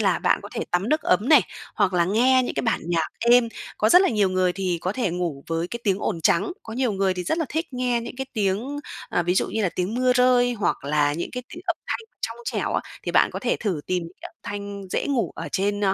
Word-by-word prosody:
là - - +2
bạn - - +2
có - - -8
thể - - -2
tắm 180 +5 0
nước 310 +2 +2
ấm 205 +7 +2
này, 305 -4 +8 0.3
hoặc 200 -3 +2
là 175 -1 +3
nghe 250 +7 +4
những - - -4
cái - - -1
bản 225 -3 +1
nhạc 165 -2 +1 0.2
êm. 240 -1 +6 0.3
Có 215 - +3
rất 360 +11 +7
là 380 - +3
nhiều 210 -4 +2
người 185 -1 +2
thì 180 -2 -1
có 185 - -1
thể 235 -4 -1
ngủ 170 -5 -3
với 165 +1 -2
cái 235 - -6
tiếng 195 -3 +2
ồn 180 -5 -2
trắng. 170 - +2
Có 225 - -8
nhiều 245 -1 0
người 195 -1 +1
thì 180 0 -4
rất 315 - 0
là 325 - +1
thích 320 +2 -2
nghe 250 -1 0
những 235 +2 -8
cái 265 +1 -4
tiếng 220 +6 -1 0.3
à, 175 - +1
ví 175 +1 +1
dụ - - +2
như 220 - -1
là 190 - +2
tiếng 180 +4 -3
mưa 255 +1 +3
rơi 250 -1 +4
hoặc 210 - -1
là 145 0 +2
những 170 +3 -4
cái 250 - -4
tiếng 345 +2 -10
âm 345 -1 0
thanh 455 - -3
trong - - -3
trẻo 475 - -2
á, - - +2 0.2
thì - - -3
bạn - - +4
có - - -3
thể - - 0
thử 190 -9 -2
tìm 180 -1 0 0.2
cái 350 - -7
âm 340 - -28
thanh 200 0 -6
dễ - - -1
ngủ 270 -5 0
ở - - -6
trên 205 +1 0
205 Hz, 270 wpm, -24 LUFS, 180-250 Hz, 0.3 s, này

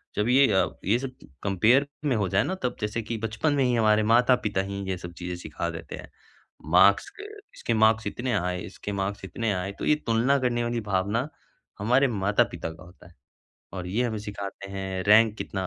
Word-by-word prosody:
जब 105 - 0
ये 135 +2 +6
अ, 95 - +3 0.2
ये 105 +5 +3
सब 135 -1 -5 0.3
कम्पेयर 110 +9 +3 0.2
में 135 - +2
हो 105 -3 0
जाए 100 +3 +2
ना 190 - -2
तब 125 - -1
जैसे 105 +2 -2
कि 115 +1 -4
बचपन 115 +7 -1
में 140 -2 +2
ही 125 -1 +2
हमारे 110 -1 +3
माता-पिता 115 -3 +3
ही 100 0 -5
ये 95 - -1
सब 90 0 -9
चीज़ें 90 0 -5
सिखा - - -4
देते - - -7
हैं। - - -11 0.6
मार्क्स 100 +3 +5
क 410 - -7 0.3
इसके 115 - -2
मार्क्स 110 0 +3
इतने 125 0 -3
आए, 90 -2 -1
इसके 105 - -7
मार्क्स 100 0 -3
इतने 115 +3 -2
आए 95 +1 -3
तो - - -3
ये 150 - +4
तुलना 120 +5 +3
करने 120 -2 0
वाली 120 0 -1
भावना 105 +5 -1 0.5
हमारे 125 +6 +3
माता-पिता 100 -6 0
का 80 - -14
होता 90 0 -16
है 90 - -19 0.6
और 90 -1 -5
ये 105 +7 0
हमें 110 -3 -2
सिखाते 100 -1 -7
हैं 95 -1 -4
रैंक 110 +1 +5
कितना 95 -1 -4
105 Hz, 205 wpm, -26 LUFS, 95-120 Hz, 0.6 s, ये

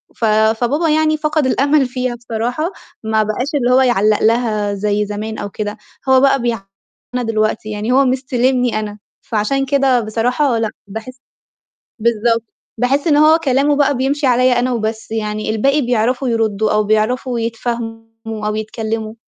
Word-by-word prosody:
ف 230 - -1
فبابا 225 +9 +2
يعني 310 0 +2
فَقد 305 -1 0
الأمل 280 +2 +2
فيها 250 -1 -3
بصراحة، 240 - -3 0.3
ما 220 0 +1
بقاش 215 +5 -2
اللي 250 -3 +1
هو 260 +1 +5
يعلّق 215 -4 +2
لها 215 -3 +1
زي 205 +1 0
زمان 215 +2 -5
أو 205 - -5
كده، 210 +1 -5 0.3
هو 260 0 +6
بقى 275 -2 +3
بيع 235 -3 -1 0.5
أنا 250 -1 -1
دلوقتي، 215 -1 -1
يعني 210 +3 -2
هو 270 +1 +4
مِستلمني 250 -2 +1
أنا، 210 -1 -5 0.2
فعشان 235 +6 -1
كده 270 -2 +2
بصراحة 235 +4 0
لأ، 225 -1 0 0.2
باحس 225 +5 -8 0.8
بالضبط. 230 0 +1 0.3
باحس 270 +6 +1
إن 295 -2 +4
هو 310 +2 +6
كلامه 285 -1 +2
بقى 285 -2 +2
بيمشي 275 +2 0
عليّا 250 0 +3
أنا 250 +1 0
وبس 220 -1 -3
يعني 215 -1 -3
الباقي 275 +7 +2
بيعرفوا 250 +2 0
يردّوا 220 -2 0
أو 210 0 +2
بيعرفوا 230 +3 0
يتفاهموا 225 -1 -5
أو 210 - -1
يتكلّموا. 220 0 -4
235 Hz, 155 wpm, -17 LUFS, 215-260 Hz, 0.8 s, هو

